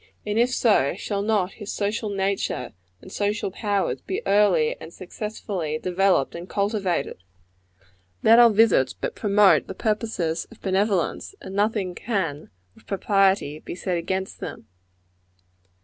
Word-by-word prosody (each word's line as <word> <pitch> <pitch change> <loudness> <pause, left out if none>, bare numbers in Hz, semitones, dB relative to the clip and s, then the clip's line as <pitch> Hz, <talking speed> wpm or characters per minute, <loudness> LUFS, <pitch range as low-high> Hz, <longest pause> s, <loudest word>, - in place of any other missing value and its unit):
And 210 +2 0
if 240 +1 +4
so, 210 - +2
shall 200 -1 -3
not 205 -3 +1
his 205 - -5
social 210 +1 -2
nature 195 0 -2 0.3
and - - -12
social 205 -1 -1
powers 200 -1 -1
be 190 - -4
early 195 -6 +3
and 160 - -9
successfully 185 -4 -5
developed 185 -3 +1
and 170 +2 -8
cultivated? 200 - -1 1.0
Let 230 +1 +7
our 240 -1 +8
visits 210 - +3
but - - -4
promote 205 -2 +4
the 190 - -7
purposes 210 -7 -1
of - - -16
benevolence, 195 - 0
and 190 - -9
nothing 205 -2 0
can, 175 -9 -3 0.2
with - - -23
propriety, 195 -6 +1
be - - -7
said 180 -1 -2
against 190 +3 -3
them. - - -7
195 Hz, 135 wpm, -24 LUFS, 180-210 Hz, 1.0 s, our